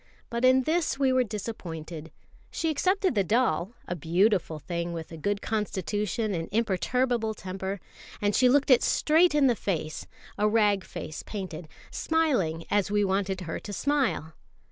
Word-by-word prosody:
But 235 +1 -2
in 260 0 +5
this 320 -1 0
we 270 -2 +2
were 255 0 +4
disappointed. 170 -7 -6 0.4
She 325 -1 -1
accepted 375 +4 +1
the 200 -4 +2
doll 210 -2 +1
a 180 - -2
beautiful 175 +1 +1
thing, 170 +2 -4
with 165 -1 -6
a - - -7
good 200 +6 -2
constitution 210 0 -1
and 165 -2 -3
imperturbable 225 +2 0
temper; 190 +1 -5 0.4
and 205 0 +1
she 255 - +5
looked 280 +1 +3
it 250 - +7
straight 320 +1 +3
in 290 -2 +4
the 245 -3 +4
face 155 -7 -3 0.3
a 210 - +3
rag 210 -3 +3
face 160 -4 -7
painted 185 -6 -6 0.2
smiling 250 - 0
as 205 -1 +2
we 205 0 +2
wanted 190 -1 -1
her 165 -3 -4
to 205 - -8
smile. 260 - 0
205 Hz, 160 wpm, -27 LUFS, 175-255 Hz, 0.4 s, it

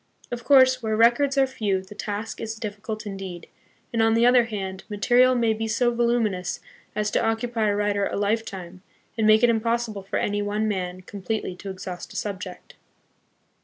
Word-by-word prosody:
Of 240 0 -4
course, 260 -2 +5
where 220 -1 -1
records 245 +5 +4
are 270 - +5
few 205 -7 -1
the 190 - -12
task 210 +1 -5
is 225 0 -4
difficult 215 0 -6
indeed, 195 -4 -6 0.5
and, 230 - +2
on 225 0 +4
the 230 +1 +4
other 245 -1 +6
hand, 195 -4 -5
material 245 +5 +4
may 230 -2 +2
be 225 +1 -3
so 240 +2 +1
voluminous 235 -6 0 0.4
as 210 0 0
to - - +1
occupy 225 0 0
a 205 - +1
writer 205 -1 +1
a - - -4
lifetime, 200 -4 -2 0.3
and 220 -1 +1
make 215 +2 +6
it 240 - +6
impossible 230 -2 -1
for 195 - -3
any 205 0 0
one 210 +1 -1
man 185 -3 -3
completely 195 0 -4
to 195 - -7
exhaust 185 -1 -7
a - - -14
subject. 190 -3 -6
215 Hz, 180 wpm, -24 LUFS, 200-235 Hz, 0.5 s, other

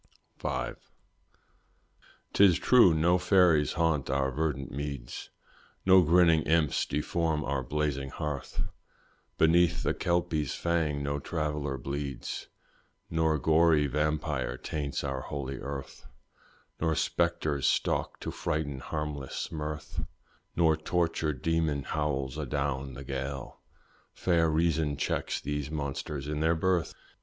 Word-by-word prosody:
V. - - -2 1.6
'Tis 95 -4 +6
true 120 -8 +6
no 85 +3 +3
fairies 85 -7 +4
haunt 80 -4 +1
our 65 0 +1
verdant 70 -1 -2
meads, 70 -3 -5 0.6
No 95 0 +8
grinning 85 -1 +5
imps 80 -2 +2
deform 80 0 -1
our 70 -1 -1
blazing 70 0 -2
hearth; 75 -1 -4 0.7
Beneath 85 +1 +4
the - - +1
kelpie's 85 -5 0
fang 80 -4 0
no 70 0 -1
traveller 75 -3 -2
bleeds, 70 +1 -4 0.6
Nor 80 -1 +2
gory 80 +1 +4
vampyre 75 -1 -1
taints 70 -3 -3
our 65 -2 -2
holy 70 -1 -5
earth, 70 -1 -7 0.7
Nor 80 -1 +1
spectres 75 -2 0
stalk - - 0
to - - -4
frighten 70 -3 -2
harmless 75 -2 -4
mirth, 75 -1 -4 0.5
Nor 80 -1 +4
tortured 80 -4 -1
demon 80 -4 +1
howls 70 -2 -2
adown 70 -2 -2
the 70 - -7
gale; 70 0 -5 0.6
Fair 85 -3 +2
reason 80 -2 +1
checks - - -1
these 75 0 -3
monsters 70 -1 -4
in 75 0 -2
their 80 +2 +3
birth. 90 0 0
75 Hz, 115 wpm, -29 LUFS, 70-80 Hz, 1.6 s, No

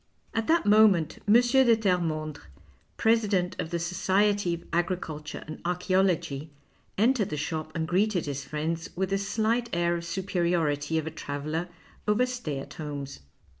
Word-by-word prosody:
At 225 0 -1
that 335 +1 +3
moment 205 -6 +4
M. 205 - +5
de 240 - +8 0.4
Tcrrcmondrc, 165 -7 -1 0.6
president 210 -5 +2
of 160 - -2
the 170 - -1
Society 190 +2 +1
of 170 - -11
Agriculture 165 -3 -2
and 155 - -8
Archaeology, 180 -5 0 0.5
entered 225 -1 +3
the 150 - -3
shop 155 +1 -3
and 160 -1 -1
greeted 185 +1 +1
his 140 -1 -4
friends 155 +3 -3
with 190 +2 -1
the 195 - +1
slight 225 +4 0
air 170 0 +1
of 170 - -6
superiority 170 -4 0
of 160 - -1
a 160 - -4
traveller 155 +3 -4 0.4
over 210 +4 +3
stay 245 - -4
at 135 - -7
homes. 145 -3 -6
175 Hz, 150 wpm, -27 LUFS, 155-200 Hz, 0.6 s, de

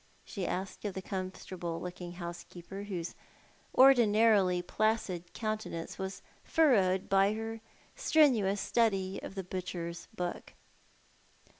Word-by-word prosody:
she 190 -4 -4
asked 190 +1 -4
of 205 -3 -3
the 190 - -3
comfortable 185 -3 -5
looking 180 -1 -6
housekeeper, 175 +2 -7
whose 180 -4 -4 0.6
ordinarily 220 -7 +6
placid 185 -2 -1
countenance 215 -7 -4
was 190 0 -5 0.2
furrowed 195 - +3
by 195 +1 +4
her 225 0 -5 0.3
strenuous 255 - +3
study 195 -5 +1
of - - -8
the 190 - -3
butcher's 175 -2 -5
book. 180 -3 -4
190 Hz, 110 wpm, -32 LUFS, 180-215 Hz, 0.6 s, ordinarily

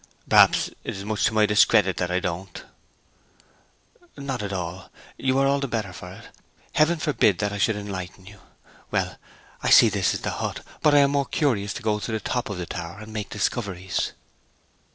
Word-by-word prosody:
'Perhaps - - +5
it - - -5
is 100 - -7
much 105 0 0
to - - +1
my 110 -1 +5
discredit 105 -2 +4
that 90 - -1
I 90 +1 +1
don't 90 +1 -5 1.5
know.' 140 - -8
'Not 135 -4 -3
at 100 -1 -4
all. 90 0 -5 0.3
You 130 0 0
are 135 - +3
all 140 +1 +2
the 140 - -2
better 110 -6 -3
for - - -9
it. - - -13 0.4
Heaven 160 +3 +3
forbid 145 - +2
that 105 0 -1
I 105 - -4
should 110 +3 +2
enlighten 95 -3 -6
you. 100 +1 -13 0.5
Well, - - -1 0.4
I - - 0
see 115 - +8
this 100 -3 +1
is - - -5
the - - -2
hut. - - -4 0.2
But 150 -1 +4
I 145 - +7
am 140 0 +3
more 140 -2 0
curious 105 -9 0
to 125 - -7
go 105 -1 +1
to 115 - -5
the 110 - -1
top 125 +3 -2
of 100 - -4
the 90 - -4
tower, 85 +2 -6
and 110 +1 -10
make 105 -2 -4
discoveries.' 95 -6 -2
105 Hz, 205 wpm, -24 LUFS, 95-125 Hz, 1.5 s, see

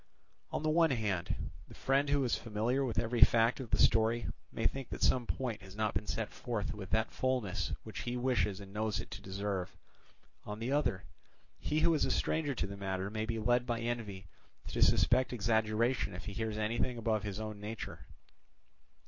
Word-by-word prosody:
On - - -2
the 155 - +2
one 165 0 +5
hand, 105 - -1 0.2
the - - -13
friend 140 +2 +2
who 140 -1 +3
is 125 - +2
familiar 115 +5 0
with 125 -4 -2
every 115 0 +1
fact 115 +2 +6
of 130 -4 -6
the - - +2
story 115 +1 +4 0.3
may 115 - -3
think 135 -3 0
that - - -4
some 125 -2 +3
point 120 -6 -2
has 95 0 -12
not 110 0 0
been 105 +2 -2
set 110 +2 -2
forth 115 -5 -3
with 95 -3 -7
that 110 0 +1
fullness 100 -10 -1
which 110 - -7
he 120 +1 -2
wishes 110 -6 +1
and 100 -1 -10
knows 110 0 0
it - - -7
to - - -7
deserve; 95 -1 -3 0.7
on 105 0 -5
the 115 +4 -3
other, 140 -10 +1 0.6
he 155 +1 0
who 165 - +5
is 155 - +2
a - - +1
stranger 150 -3 0
to - - -1
the 100 0 -6
matter 95 0 -2
may 110 0 -2
be 115 0 -1
led 120 +3 +2
by 120 -2 0
envy 115 -5 -3 0.4
to - - -2
suspect 125 +1 +4
exaggeration 110 -1 +1
if 90 - -7
he 105 - -5
hears 110 0 -2
anything 115 +3 0
above 110 -2 +1
his 100 -1 -4
own 110 -1 -5
nature. 110 +1 -6
110 Hz, 200 wpm, -33 LUFS, 105-125 Hz, 0.7 s, fact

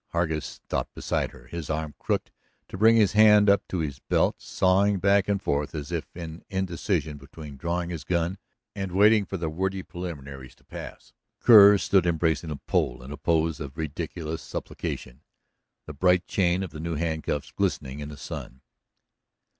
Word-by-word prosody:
Hargus 80 -3 -1
stopped - - -5
beside - - -1
her, - - -16
his 80 +3 -7
arm 80 -1 -2
crooked - - -2 0.4
to - - -7
bring 110 +2 +6
his 105 -4 +4
hand 105 -1 +6
up 100 - +3
to 95 - -3
his 70 -3 -4
belt, - - +1
sawing 95 +2 +2
back 100 +1 +3
and 100 -1 +1
forth 75 -4 -2
as 75 +1 -5
if 85 -2 -2
in 85 -1 -8
indecision 85 -5 -2
between 70 +1 -11
drawing 85 +4 -2
his 80 -5 -5
gun 85 +3 -1 0.3
and 95 -2 -5
waiting 105 +2 +5
for 95 - -4
the 85 -2 -3
wordy 95 +4 -2
preliminaries 70 -9 -8
to - - -28
pass. - - -10 0.3
Kerr 105 -3 +9
stood 95 -2 +2
embracing 80 -1 0
the 75 - -3
pole 65 -2 -1
in 65 - -9
a 75 - -6
pose 80 -1 +1
of 70 -2 -7
ridiculous 80 +1 -4
supplication, 65 +3 -6 0.6
the 75 - -8
bright 90 +4 +3
chain 90 0 +1
of 90 - -6
the 75 - -8
new 85 +1 -3
handcuffs 80 -2 -2
glistening 65 +2 -2
in 75 0 -6
the 75 - -9
sun. 65 -1 -8
85 Hz, 175 wpm, -26 LUFS, 75-95 Hz, 0.6 s, Kerr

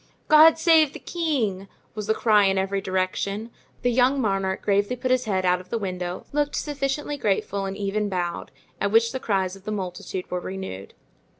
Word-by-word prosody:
"God 310 +1 +8
save 320 -3 +4
the - - -8
king!" 245 - -2 0.3
was 215 -1 -5
the 220 - +2
cry 210 -3 +4
in 195 0 +2
every 195 +1 0
direction; 195 +3 -2 0.3
the 245 - +2
young 255 +3 +3
monarch 195 -4 -1
gravely 205 +4 +1
put 255 +1 -2
his 255 0 +2
head 190 -3 0
out 180 0 +2
of 185 - -19
the 230 - -1
window, 180 -3 -4
looked 290 0 0
sufficiently 290 0 -2
grateful 200 -3 -1
and 195 0 -4
even 205 +1 -1
bowed; 175 -2 -3 0.3
at 200 - 0
which 230 +1 +4
the 260 - -4
cries 190 -5 -1
of 195 - -15
the 215 - -4
multitude 185 -2 -5
were 180 - -1
renewed. 180 - -7
200 Hz, 190 wpm, -24 LUFS, 190-255 Hz, 0.3 s, God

